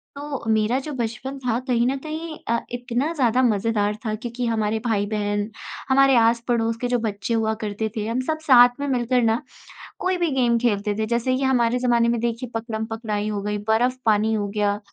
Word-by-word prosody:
तो 285 Hz, -1 st, -5 dB
मेरा 220 Hz, +3 st, +2 dB
जो 300 Hz, +3 st, -6 dB
बचपन 250 Hz, +2 st, -4 dB
था 245 Hz, -2 st, -1 dB
कहीं 240 Hz, -1 st, +2 dB
न 270 Hz, +2 st, 0 dB
कहीं 315 Hz, +1 st, -6 dB
अ, 235 Hz, 0 st, +1 dB
इतना 245 Hz, +4 st, -2 dB
ज़्यादा 255 Hz, -4 st, +2 dB
मज़ेदार 210 Hz, -2 st, +1 dB
था 215 Hz, -, -1 dB
क्योंकि 240 Hz, +2 st, -4 dB
हमारे 220 Hz, -1 st, 0 dB
भाई-बहन, 205 Hz, -1 st, -1 dB, 0.4 s
हमारे 270 Hz, 0 st, +5 dB
आस-पड़ोस 230 Hz, 0 st, +2 dB
के 245 Hz, -, 0 dB
जो 245 Hz, -1 st, +1 dB
बच्चे 215 Hz, +1 st, -3 dB
हुआ 220 Hz, -1 st, +1 dB
करते 215 Hz, +1 st, -2 dB
थे, 210 Hz, -, -2 dB
हम 235 Hz, +3 st, -1 dB
सब 315 Hz, 0 st, -1 dB
साथ 250 Hz, -5 st, +7 dB
में 285 Hz, -, -2 dB
मिलकर 250 Hz, -1 st, +1 dB
ना 225 Hz, +1 st, +2 dB, 0.6 s
कोई 370 Hz, 0 st, 0 dB
भी 345 Hz, -2 st, +1 dB
गेम 240 Hz, -2 st, +3 dB
खेलते 210 Hz, -3 st, 0 dB
थे। 220 Hz, -, +1 dB
जैसे 240 Hz, +3 st, 0 dB
कि 270 Hz, -, -2 dB
हमारे 250 Hz, -2 st, +2 dB
ज़माने 240 Hz, -2 st, +2 dB
में 235 Hz, -1 st, +1 dB
देखिए 235 Hz, +1 st, -2 dB
पकड़म-पकड़ाई 220 Hz, -2 st, -3 dB
हो 205 Hz, -1 st, -2 dB
गई, 210 Hz, +1 st, -2 dB
बर्फ़-पानी 220 Hz, 0 st, +1 dB
हो 205 Hz, -2 st, -1 dB
गया, 205 Hz, 0 st, +1 dB
235 Hz, 190 wpm, -23 LUFS, 220-255 Hz, 0.6 s, साथ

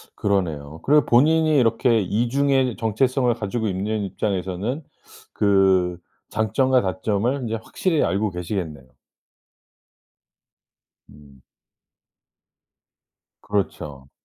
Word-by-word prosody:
그러네요. 80 Hz, -7 st, -2 dB
그리고 150 Hz, +1 st, +4 dB
본인이 155 Hz, +5 st, +4 dB
이렇게 115 Hz, -1 st, +3 dB
이중의 125 Hz, +5 st, +1 dB
정체성을 125 Hz, +3 st, +1 dB
가지고 110 Hz, +1 st, -3 dB
있는 105 Hz, +3 st, -2 dB
입장에서는 100 Hz, -, -3 dB, 0.5 s
그 95 Hz, -3 st, +3 dB, 0.3 s
장점과 125 Hz, +4 st, +2 dB
단점을 100 Hz, +6 st, -1 dB
인제 115 Hz, -1 st, -2 dB
확실히 170 Hz, -5 st, 0 dB
알고 100 Hz, +1 st, 0 dB
계시겠네요. 85 Hz, -6 st, -5 dB, 2.2 s
음. 70 Hz, -2 st, -18 dB, 2.1 s
그렇죠. 75 Hz, -9 st, -3 dB
105 Hz, 225 characters per minute, -22 LUFS, 95-125 Hz, 2.2 s, 그리고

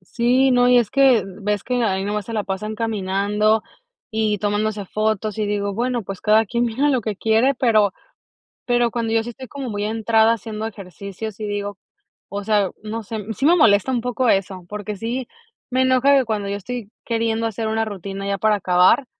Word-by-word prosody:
Sí, 255 Hz, +3 st, +3 dB
no. 245 Hz, 0 st, +4 dB
Y 250 Hz, -, +6 dB
es 235 Hz, -4 st, +1 dB
que 265 Hz, -5 st, +5 dB
ves 205 Hz, +2 st, -3 dB
que 250 Hz, 0 st, -1 dB
ahí 190 Hz, -3 st, 0 dB
nomás 205 Hz, 0 st, -3 dB
se 230 Hz, -, -5 dB
la 215 Hz, -2 st, -1 dB
pasan 210 Hz, +3 st, -4 dB
caminando, 210 Hz, 0 st, +1 dB, 0.5 s
y 215 Hz, -1 st, 0 dB
tomándose 205 Hz, 0 st, -1 dB
fotos, 215 Hz, +1 st, -1 dB
y 210 Hz, -, 0 dB
digo: 200 Hz, -1 st, -1 dB
"Bueno, 240 Hz, +2 st, -1 dB
pues 195 Hz, 0 st, -7 dB
cada 215 Hz, +1 st, +4 dB
quien 235 Hz, +3 st, 0 dB
mira 255 Hz, +6 st, +1 dB
lo 260 Hz, -4 st, +1 dB
que 215 Hz, -1 st, -3 dB
quiere". 225 Hz, +7 st, +2 dB
Pero 215 Hz, -6 st, +3 dB, 0.7 s
pero 240 Hz, -2 st, +2 dB
cuando 230 Hz, -2 st, -2 dB
yo 225 Hz, 0 st, +2 dB
sí 240 Hz, -, -5 dB
estoy 260 Hz, +2 st, -10 dB
como 275 Hz, 0 st, -6 dB
muy 205 Hz, -1 st, -3 dB
entrada 225 Hz, +1 st, +3 dB
haciendo 220 Hz, -1 st, -6 dB
ejercicios 200 Hz, +1 st, -8 dB
y 215 Hz, -, -3 dB
digo 205 Hz, -1 st, -4 dB, 0.5 s
o 200 Hz, +1 st, -4 dB
sea, 205 Hz, -3 st, +2 dB
no 220 Hz, +1 st, -5 dB
sé, 220 Hz, +2 st, -5 dB, 0.2 s
sí 275 Hz, -, 0 dB
me 335 Hz, -, +6 dB
molesta 205 Hz, -, +4 dB
un 245 Hz, -, +1 dB
poco 250 Hz, +1 st, 0 dB
eso. 190 Hz, -3 st, 0 dB
Porque 210 Hz, +1 st, -5 dB
sí 235 Hz, +4 st, -3 dB, 0.4 s
me 260 Hz, +1 st, +2 dB
enoja 260 Hz, +2 st, +4 dB
que 265 Hz, -, +3 dB
cuando 215 Hz, -3 st, -2 dB
yo 200 Hz, -, -2 dB
estoy 230 Hz, 0 st, -6 dB
queriendo 230 Hz, -1 st, 0 dB
hacer 225 Hz, 0 st, -3 dB
una 220 Hz, 0 st, 0 dB
rutina 195 Hz, -1 st, -6 dB
ya 200 Hz, 0 st, -1 dB
para 215 Hz, +1 st, +3 dB
acabar 180 Hz, +7 st, +3 dB
220 Hz, 200 wpm, -21 LUFS, 205-235 Hz, 0.7 s, Y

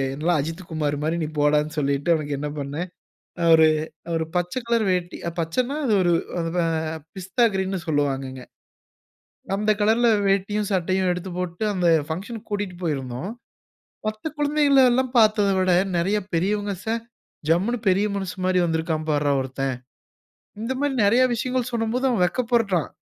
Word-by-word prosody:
எல்லாம் 160 Hz, +3 st, +1 dB
அஜித்துகுமாரு 160 Hz, -1 st, -3 dB
மாரி 160 Hz, +2 st, 0 dB
நீ 155 Hz, -, -1 dB
போடானு 150 Hz, +1 st, +2 dB
சொல்லிட்டு 140 Hz, +1 st, 0 dB
அவனுக்கு 145 Hz, -3 st, -1 dB
என்ன 150 Hz, -, -3 dB
பணனேன். 145 Hz, +5 st, -4 dB, 0.5 s
அ -, -, +1 dB
ஒரு 160 Hz, 0 st, +7 dB, 0.5 s
ஒரு 165 Hz, -1 st, 0 dB
பச்ச 175 Hz, 0 st, 0 dB
கலர் 235 Hz, -1 st, +2 dB
வேட்டி 180 Hz, -1 st, -2 dB, 0.2 s
பச்சனா 245 Hz, -, -1 dB
அது 230 Hz, -, +2 dB
ஒரு 175 Hz, -1 st, +3 dB, 0.3 s
அ -, -, +1 dB, 0.7 s
பிஸ்தா 195 Hz, +6 st, 0 dB
கிரீன்னு 190 Hz, 0 st, -1 dB
சொல்லுவாங்கங்க. 135 Hz, -3 st, -1 dB, 1.1 s
அந்த 210 Hz, +2 st, +1 dB
கலர்‌ல 225 Hz, +3 st, +4 dB, 0.2 s
வேட்டியும், 200 Hz, +2 st, +1 dB
சட்டையும் 185 Hz, 0 st, +1 dB
எடுத்து 180 Hz, +1 st, -5 dB
போட்டு. 180 Hz, +1 st, -4 dB
அந்த 180 Hz, -2 st, 0 dB, 0.2 s
பங்ஷன்‌க்கு 205 Hz, +7 st, -5 dB
கூட்டிட்டு 205 Hz, -3 st, -3 dB
போயிருந்தோம். 135 Hz, 0 st, -3 dB, 0.8 s
மத்த 215 Hz, +8 st, -3 dB
குழந்தைகள 290 Hz, -2 st, +4 dB
எல்லாம் 255 Hz, 0 st, 0 dB
பார்த்ததை 215 Hz, -2 st, +4 dB
விட 185 Hz, -1 st, +2 dB, 0.3 s
நிறைய 195 Hz, +5 st, +1 dB, 0.2 s
பெரியவங்க 205 Hz, +4 st, 0 dB
ச -, -, -6 dB, 0.6 s
ஜம்முனு 200 Hz, +9 st, +2 dB
பெரிய 195 Hz, +3 st, +3 dB
மனுசன் 190 Hz, -1 st, -4 dB
மாரிவந்திருக்கான் 165 Hz, -3 st, 0 dB
பார்ரா 145 Hz, -1 st, +2 dB
ஒருத்தன். 135 Hz, 0 st, -3 dB, 0.8 s
இந்த 230 Hz, +4 st, -2 dB
மாரி 285 Hz, -1 st, 0 dB
நிறைய 235 Hz, +6 st, +4 dB
விஷயங்கள் 250 Hz, +1 st, -1 dB
சொல்லும்போது 235 Hz, +3 st, 0 dB
அவன் 225 Hz, -7 st, +1 dB
வெட்கப்பருடுறான். 220 Hz, -, +1 dB
185 Hz, 140 wpm, -23 LUFS, 160-215 Hz, 1.1 s, ஒரு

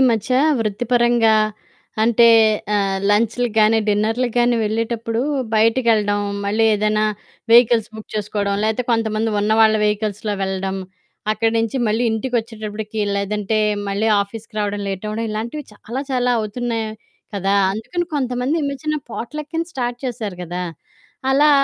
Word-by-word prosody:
మధ్య 225 Hz, +2 st, -3 dB, 0.3 s
వృత్తిపరంగా 235 Hz, +1 st, +2 dB, 0.7 s
అంటే, 235 Hz, +1 st, +5 dB, 0.5 s
ఆహ్, 195 Hz, -1 st, +1 dB
లం‌చ్లు 230 Hz, +3 st, +2 dB
గానీ, 220 Hz, +1 st, +5 dB
డిన్నర్లు 220 Hz, +4 st, +1 dB
గానీ, 240 Hz, 0 st, +3 dB
వెళ్ళేటప్పుడు 230 Hz, +1 st, -2 dB, 0.3 s
బయటికెళ్ళడం. 220 Hz, -2 st, +3 dB, 0.2 s
మళ్ళీ 215 Hz, +3 st, +1 dB
ఏదైనా 215 Hz, +1 st, +1 dB, 0.5 s
వెహికల్స్ 230 Hz, -2 st, +5 dB
బుక్ 220 Hz, -, -10 dB
చేసుకోవడం, 205 Hz, -1 st, -1 dB
లేతే 220 Hz, +3 st, 0 dB
కొంతమంది 225 Hz, -1 st, 0 dB
ఉన్న 210 Hz, +1 st, +1 dB
వాళ్ళ 220 Hz, 0 st, +6 dB
వెహికల్స్‌లో 210 Hz, 0 st, -1 dB
వెళ్ళడం, 190 Hz, 0 st, -2 dB, 0.6 s
అక్కడి 225 Hz, +1 st, 0 dB
నుంచి 225 Hz, +3 st, -1 dB
మళ్ళీ 220 Hz, +3 st, +1 dB
ఇంటికొచ్చేటప్పటికి 220 Hz, -2 st, -3 dB, 0.2 s
లేదంటే 210 Hz, +2 st, -1 dB, 0.3 s
మళ్ళీ 205 Hz, +3 st, 0 dB
ఆఫీస్‌కి 215 Hz, +2 st, -11 dB
రావడం 205 Hz, 0 st, -2 dB
లేటవ్వడం, 210 Hz, +4 st, -3 dB
ఇలాంటివి 235 Hz, +8 st, -4 dB
చాలా 235 Hz, +6 st, -5 dB
చాలా 250 Hz, -1 st, +1 dB
అవుతున్నాయి 225 Hz, +1 st, -3 dB, 0.5 s
కదా! 195 Hz, 0 st, 0 dB, 0.2 s
అందుకని 340 Hz, -, -3 dB
కొంతమంది 255 Hz, +2 st, -1 dB
చిన్న 280 Hz, -1 st, -2 dB
చిన్న 305 Hz, 0 st, 0 dB
పోట్లకని 300 Hz, +8 st, -4 dB
స్టార్ట్ 245 Hz, -3 st, -3 dB
చేశారు 215 Hz, -6 st, -5 dB
గదా! 175 Hz, +1 st, -4 dB, 0.7 s
అలా 295 Hz, +2 st, +5 dB
220 Hz, 120 wpm, -20 LUFS, 210-240 Hz, 0.7 s, వాళ్ళ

